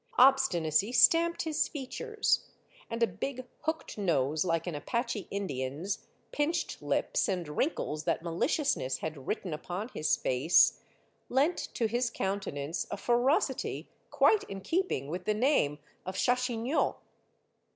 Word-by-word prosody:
Obstinacy 200 - +4
stamped 330 +8 +5
his 315 -2 0
features, 425 - -1 0.4
and 230 0 -1
a - - +8
big 255 +6 -5 0.2
hooked 315 -8 -3
nose 155 -5 +1
Hke 165 -2 0
an 175 - -3
Apache 235 - -2
Indian's, 160 -1 -3 0.2
pinched 320 +4 -1
lips, - - 0
and 180 -4 -2
wrinkles 155 - -1
that - - 0
maliciousness 170 - 0
had 150 -4 -6
written 190 -6 -2
upon 180 +8 -5
his 155 - +1
face, 130 +7 +4 0.5
lent 285 +7 +2 0.2
to 235 - +1
his 240 +2 +1
countenance 190 -8 -3
a 205 - -4
ferocity 245 - +1 0.2
quite 425 -1 +4
in 195 -1 -7
keeping 330 - -1
with 180 +4 -5
the 215 - +1
name 215 - +2 0.3
of 185 - -5
Chachignot. 245 +3 +1
210 Hz, 130 wpm, -30 LUFS, 165-265 Hz, 0.5 s, a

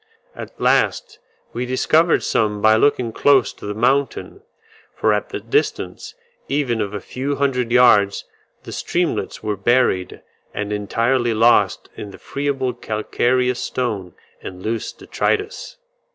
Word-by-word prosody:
At - - -10
last - - +1 0.3
we 125 +1 -3
discovered 155 +6 +2
some 105 -2 0
by 110 +1 +5
looking 125 -1 +2
close 135 +1 +3
to - - -10
the 105 - -4
mountain, 135 - 0 0.5
for - - +2
at - - -2
the - - -4
distance 435 +1 -2 0.3
even 130 -6 0
of 105 0 -3
a - - -3
few 135 +8 -4
hundred 125 -4 0
yards 105 -5 +4 0.4
the - - -9
streamlets - - -2
were 105 -1 -1
buried 100 -3 +1 0.3
and 105 0 -3
entirely 115 +3 0
lost 115 +2 +3
in 105 - -7
the 100 - -12
friable 135 -3 -2
calcareous 125 +3 -1
stone 105 -9 -3 0.3
and 90 0 -9
loose 115 +1 -3
detritus. 425 +3 -3
120 Hz, 135 wpm, -20 LUFS, 105-130 Hz, 0.5 s, by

